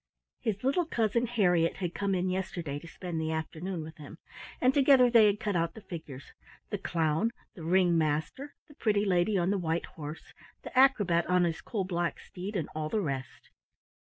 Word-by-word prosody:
His 215 -2 -2
little 295 +6 +1
cousin 235 -2 +1
Harriett 180 -8 +2
had 175 -3 -3
come 200 -1 0
in 180 0 0
yesterday 175 -6 -3
to 170 - -12
spend 170 -1 -5
the 160 0 -1
afternoon 160 +2 -4
with 160 +1 -10
him, 150 +2 -11 0.4
and 255 +1 +3
together 265 -3 +6
they 225 -3 +7
had 205 0 +1
cut 205 -3 -2
out 165 -1 0
the 220 - -10
figures 155 -7 -9 0.2
— - - -25
the 205 - -2
clown, 165 +3 +1 0.2
the 175 - -11
ring 175 0 +3
master, 155 - -2
the 295 - -16
pretty 210 -6 +1
lady 185 +2 +2
on 180 +1 +1
the 200 - +1
white 165 -1 -1
horse, 150 0 -9 0.3
the - - -9
acrobat 205 -11 +4
on 180 0 +3
his 165 -2 -1
coal 210 -4 -2
black 175 -2 -2
steed, 195 +4 -7
and 165 -6 -1
all 155 0 -3
the 220 - 0
rest. 135 -7 -5
180 Hz, 195 wpm, -30 LUFS, 160-210 Hz, 0.4 s, they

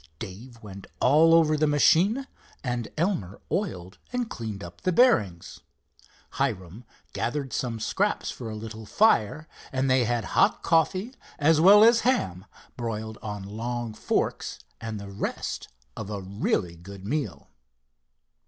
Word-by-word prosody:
Dave 115 +6 -9
went 100 -2 -10
all 155 +5 +5
over 155 -2 +4
the 155 0 +2
machine 180 - +4 0.4
and 120 -4 -2
Elmer 155 - -1
oiled 95 - -3
and 245 -2 -2
cleaned 110 -4 -5
up 85 0 -11
the 185 - +1
bearings. 105 - +2 0.8
Hiram 110 -4 -2 0.3
gathered 135 +1 -2
some 115 -3 -2
scraps - - 0
for 115 - -7
a 110 - -5
little 110 0 -8
fire, 155 - +2 0.2
and 130 0 0
they 130 -2 +4
had 120 -1 0
hot - - +3
coffee, 185 - +1 0.2
as 155 +1 +4
well 205 +4 +8
as 230 +1 +6
ham 95 - 0 0.3
broiled 110 -2 -4
on 105 -2 -5
long 115 +3 -4
forks, - - -1 0.2
and 110 -2 -5
the 100 -1 -8
rest 100 - -4 0.3
of - - -6
a 105 -1 -4
really 95 -2 -1
good 95 +3 -11
meal. 145 +6 -3
120 Hz, 140 wpm, -26 LUFS, 100-155 Hz, 0.8 s, well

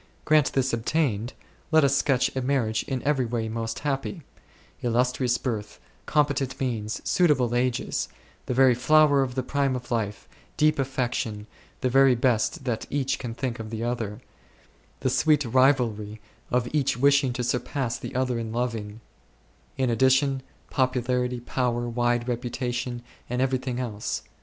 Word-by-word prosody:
Grant 150 -3 +4
this 135 -1 +1
ob 115 -1 -1
tained; 120 -7 0 0.4
let 160 -1 +5
us 140 0 +3
sketch 130 -2 +1
a 130 - 0
marriage 125 -4 +1
in 130 -2 -3
every 140 -2 +2
way 115 -1 -2
most 115 0 -4
happy; 145 +4 -2 0.6
illustrious 125 +1 +1
birth, 110 -5 -4 0.3
competent 140 -3 +1
means, 115 -4 -2
suitable 140 -9 +3
ages, 125 +1 0 0.4
the - - 0
very 130 -1 +6
flower 145 +3 +4
of 125 -2 -2
the 130 - -1
prime 140 -1 0
of 125 0 -7
life, 105 -3 -2 0.3
deep 155 -1 +3
affection, 125 -5 -2 0.4
the 130 - +1
very 135 0 +6
best 120 +1 +1
that 120 -3 -2
each 135 -2 -1
can 120 -3 -5
think 125 -2 -3
of 110 -1 -6
the 110 0 -4
other 115 -3 -3 0.4
\ - - -33
that - - +1
sweet 150 -2 +3
rivalry 115 -4 +2 0.3
of 125 -1 +1
each 140 -6 +1
wishing 140 0 +4
to 125 - -2
surpass 125 0 -2
the - - -7
other 125 -2 0
in 115 -1 -4
loving; 115 -3 -3 0.8
in 130 -2 +1
addition, 130 +2 +3 0.3
popularity, 125 -1 0
power, 120 -1 -1
wide 120 0 0
reputation, 120 0 -3 0.3
and 125 +1 -2
everything 130 -1 0
else. 110 -4 -3
125 Hz, 150 wpm, -26 LUFS, 120-135 Hz, 0.8 s, very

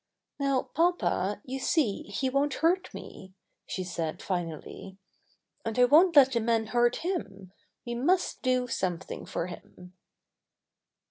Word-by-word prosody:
^^Now, 265 -2 0
papa, 245 - +1
you 265 +1 -4
see 265 -7 0
he 205 +6 -2
won't 275 +2 +1
hurt 355 +3 +1
me," 190 0 -11 0.3
she 185 - -3
said 165 -3 -4
finally, 175 +1 -5 0.7
"and 225 0 -4
I 250 - +7
won't 330 +6 +5
let 270 -2 +8
the 235 - +1
men 225 0 +1
hurt 240 +1 +2
him. 195 - -4 0.3
We 240 - -4
must 345 +10 +1
do 255 -1 +1
something 185 -6 -3
for 170 - -2
him." 180 0 -11
240 Hz, 135 wpm, -28 LUFS, 190-275 Hz, 0.7 s, let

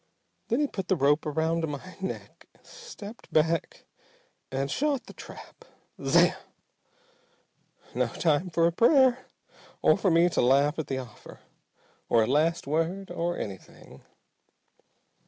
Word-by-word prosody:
Then 240 +5 +1
he - - +3
put 195 -9 -5
the 190 - +2
rope 145 0 +2
around 160 +2 0
my 150 +5 -7
neck, 190 - -7 0.2
stepped 240 - -12
back 160 +1 0 0.7
and 135 +1 -2
shot 285 -2 0
the - - -12
trap. - - -12 0.4
Zamm! - - +4 1.6
No - - +1
time 165 +2 0
for 165 0 +2
a 170 - +3
prayer 255 - +4 0.6
or - - +6
for 195 - +2
me 170 +1 +4
to - - 0
laugh 140 +5 +3
at 155 - -3
the 135 - -2
offer! 120 -5 -10 0.7
or 115 -1 +4
a - - +1
last 155 +7 +1
word 165 +6 -2
or 175 0 -2
anything. 95 -3 -9
165 Hz, 135 wpm, -27 LUFS, 145-195 Hz, 1.6 s, or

